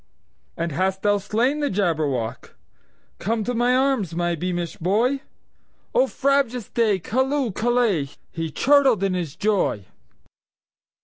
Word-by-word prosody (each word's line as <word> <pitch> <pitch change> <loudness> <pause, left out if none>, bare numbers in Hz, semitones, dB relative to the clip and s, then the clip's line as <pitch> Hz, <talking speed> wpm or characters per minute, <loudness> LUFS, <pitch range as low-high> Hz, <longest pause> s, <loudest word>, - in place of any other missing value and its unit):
"And 170 0 -2
hast 190 +5 -1
thou 205 0 +3
slain 235 +9 0
the 290 -1 0
Jabberwock? 150 - -1 0.6
Come 220 +2 -1
to 245 - -2
my 245 +1 +2
arms, 255 - +1
my 175 0 0
beamish 175 0 -3
boy!O 255 - -2
frabjous 270 -4 0
day! 220 -4 +2
Callooh! 260 - 0
Callay!"He 185 - -1
chortled 265 - +3
in 195 -1 +1
his 170 -5 -3
joy. 200 - 0
205 Hz, 115 wpm, -23 LUFS, 175-250 Hz, 0.6 s, thou